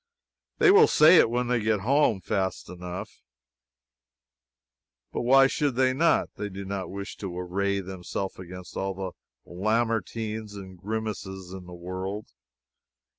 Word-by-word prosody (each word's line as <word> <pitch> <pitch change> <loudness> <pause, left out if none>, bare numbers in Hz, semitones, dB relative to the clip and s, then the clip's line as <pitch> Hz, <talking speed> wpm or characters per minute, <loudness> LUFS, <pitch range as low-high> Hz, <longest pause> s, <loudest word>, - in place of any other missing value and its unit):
They 425 -4 +6
will 430 +2 +8
say 160 - +7
it - - +6
when 125 +1 0
they 125 0 +2
get 105 -1 +1
home, 125 -3 +3
fast 95 -2 -2
enough, 90 +3 -7 1.9
but - - -1
why 135 +3 +6
should 140 -1 0
they 130 0 +3
not? 165 +5 +2
They 105 - -3
do 100 0 -7
not 95 -1 -4
wish 100 +1 -6
to 90 -3 -6
array 100 +2 -1
themselves 95 +1 -5
against 90 0 -9
all 95 0 -2
the 95 -1 -4 0.3
Lamartines 110 +1 -1
and 95 -2 -9
Grimeses 100 -3 -5
in 95 -2 -9
the 90 - -9
world. 95 +4 -5
100 Hz, 140 wpm, -27 LUFS, 95-115 Hz, 1.9 s, will